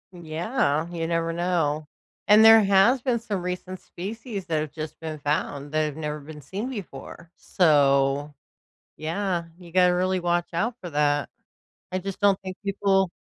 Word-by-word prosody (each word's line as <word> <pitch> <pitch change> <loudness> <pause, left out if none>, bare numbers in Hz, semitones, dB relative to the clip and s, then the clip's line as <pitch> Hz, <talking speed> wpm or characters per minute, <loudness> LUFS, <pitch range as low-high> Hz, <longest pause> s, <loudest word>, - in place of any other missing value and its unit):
Yeah, 165 - -1
you 165 -2 -3
never 165 0 -1
know. 165 -4 0 0.4
And 215 +2 +7
there 225 0 +9
has 200 +6 +4
been 250 -3 0
some 210 -5 -4
recent 180 +1 -5
species 205 +1 -7
that 160 -3 0
have 150 -1 -4
just 155 -1 -7
been 160 -2 -6
found 145 0 -2
that 155 0 +1
have 150 -1 -5
never 150 -1 -4
been 150 +1 -11
seen 200 - -5
before, 170 - -9
so, 145 -3 +2 0.6
yeah, 175 +2 -2
you 175 -2 -13
gotta 180 0 +4
really 185 +1 +1
watch 175 0 0
out 210 +9 -1
for 175 -2 -7
that. 145 -1 +1 0.6
I 185 - 0
just 195 +2 -6
don't 200 -1 +3
think 185 -1 -7
people 195 -1 +1
175 Hz, 165 wpm, -25 LUFS, 155-195 Hz, 0.6 s, there